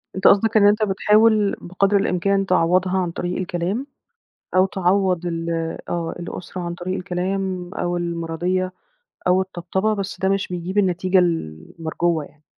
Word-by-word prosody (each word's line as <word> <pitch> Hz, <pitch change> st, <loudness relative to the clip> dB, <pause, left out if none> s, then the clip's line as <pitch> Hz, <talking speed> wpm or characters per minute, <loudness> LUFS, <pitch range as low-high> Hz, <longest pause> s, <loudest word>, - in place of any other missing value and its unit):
أنت 190 Hz, -, +3 dB
قصدك 220 Hz, +3 st, +5 dB
إن 205 Hz, -1 st, +6 dB
أنت 210 Hz, +1 st, +3 dB
بتحاول 210 Hz, +1 st, +3 dB
بقدر 195 Hz, +3 st, +1 dB
الإمكان 195 Hz, +1 st, +1 dB
تعوَّضها 185 Hz, +1 st, +2 dB
عن 180 Hz, -2 st, 0 dB
طريق 175 Hz, +1 st, -3 dB
الكلام 185 Hz, +8 st, -2 dB, 0.7 s
أو 185 Hz, +1 st, +5 dB
تعوَّض 185 Hz, -1 st, +1 dB
ال 165 Hz, -1 st, -3 dB, 0.4 s
آه، 170 Hz, -1 st, -2 dB
الأسرة 180 Hz, +1 st, -6 dB
عن 175 Hz, -1 st, -4 dB
طريق 180 Hz, +2 st, -4 dB
الكلام 185 Hz, 0 st, -3 dB
أو 175 Hz, 0 st, -1 dB
المِراضيّة 175 Hz, +2 st, -2 dB, 0.6 s
أو 180 Hz, +1 st, +4 dB
الطبطبة، 190 Hz, +3 st, -1 dB
بس 200 Hz, -1 st, -4 dB
ده 190 Hz, -, +1 dB
مش 195 Hz, 0 st, 0 dB
بيجيب 180 Hz, +2 st, -4 dB
النتيجة 185 Hz, -1 st, +3 dB
ال 165 Hz, -, 0 dB, 0.2 s
المرجوّة 165 Hz, 0 st, 0 dB
يعني. 150 Hz, +1 st, -21 dB
185 Hz, 150 wpm, -22 LUFS, 175-195 Hz, 0.7 s, إن